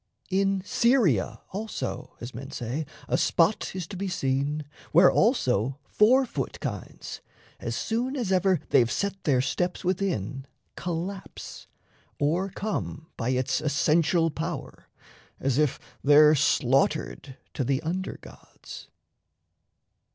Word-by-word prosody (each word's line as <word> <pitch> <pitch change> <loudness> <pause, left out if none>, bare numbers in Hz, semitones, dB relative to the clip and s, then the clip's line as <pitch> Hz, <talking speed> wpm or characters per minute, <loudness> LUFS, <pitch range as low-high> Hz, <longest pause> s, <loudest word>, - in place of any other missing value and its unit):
In 195 0 +1
Syria 180 - +2
also 200 - -5
as 120 +2 -7
men 135 +3 -7
say 130 +6 -4 0.2
a - - +1
spot 175 +3 +2
Is 185 -3 -3
to 195 - -9
be 195 +2 -3
seen, 145 -2 -1 0.3
where 175 +3 +7
also 130 - +2
four 250 - +4
foot - - -4
kinds, - - -6 0.4
As - - -3
soon 245 +5 -1
as 235 -8 -2
ever 185 -2 +3
they've 120 -1 +4
set 200 -1 -2
their 135 -5 +3
steps 175 +7 -2
within, 140 - -1 0.3
Collapse, 180 +3 -5 0.5
o'ercome 180 +2 -2
by 115 - -2
its 130 +2 0
essential 160 +3 +2
power, 160 -1 -5 0.5
As 135 0 +1
if 150 -4 +2 0.3
there 150 +2 +7
slaughtered 135 0 +1 0.2
to 135 - -1
the 135 +1 +1
under 185 +4 -3
gods. - - -12
160 Hz, 120 wpm, -27 LUFS, 135-190 Hz, 0.5 s, where